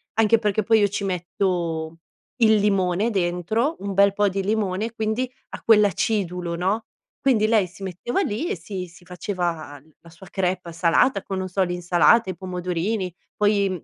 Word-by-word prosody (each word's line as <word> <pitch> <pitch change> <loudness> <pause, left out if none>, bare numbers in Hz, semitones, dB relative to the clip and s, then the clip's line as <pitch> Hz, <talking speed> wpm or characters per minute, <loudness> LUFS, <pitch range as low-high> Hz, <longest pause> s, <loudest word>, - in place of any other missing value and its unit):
anche 225 +1 +4
perché 210 -1 0
poi 225 +2 +4
io 205 - +4
ci 200 +1 -3
metto 170 -3 -2 0.4
il 220 -3 +5
limone 200 +1 +1
dentro, 195 - 0
un 200 0 -4
bel 200 0 +5
po' 205 0 +2
di 195 +1 -2
limone, 210 +1 -1
quindi 225 +3 -2 0.2
ha - - -8
quell'acidulo, 200 -5 +2
no, 195 +6 -1 0.4
quindi 235 -6 +3
lei 215 -3 +3
si 180 +3 -17
metteva 190 - -2
lì 285 - -2
e - - -1
si 180 +2 -6
si 175 +1 -18
faceva 175 -5 -4 0.2
la 170 - -16
sua 170 +3 -14
crêpe 180 -2 -2
salata 180 +6 +2
con 190 -1 -4
non 185 - -3
so 190 +1 +1
l'insalata, 180 +4 +3
i 185 - -3
pomodorini 180 +2 -2 0.3
poi, 200 -4 +1
195 Hz, 165 wpm, -23 LUFS, 180-215 Hz, 0.4 s, il